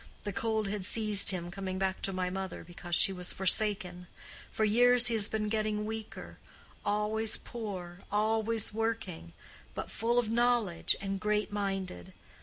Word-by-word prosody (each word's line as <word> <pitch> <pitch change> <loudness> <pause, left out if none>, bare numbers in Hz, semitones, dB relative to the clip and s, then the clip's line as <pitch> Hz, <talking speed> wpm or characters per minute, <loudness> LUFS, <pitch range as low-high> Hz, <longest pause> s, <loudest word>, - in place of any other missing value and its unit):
The 205 - -4
cold 220 0 -1
had 200 -1 -3
seized 210 0 +4
him 175 -2 -2
coming 190 0 -4
back 190 0 -1
to 195 - -1
my 185 -1 -2
mother, 190 -1 -5
because 175 0 -4
she 195 - +4
was 180 -1 -3
forsaken. 190 -2 +2 0.4
For 220 - 0
years 245 +3 +5
he - - +1
has 215 -2 +1
been 215 -1 -1
getting 215 -1 -1
weaker—always 220 0 -4
poor, 190 -6 -7
always 220 +1 +1
working—but 220 - -5
full 235 +2 0
of 240 -2 +2
knowledge, 235 -7 +2
and 195 -1 -3
great 210 0 0
minded. 195 - -4
210 Hz, 145 wpm, -31 LUFS, 190-220 Hz, 0.4 s, years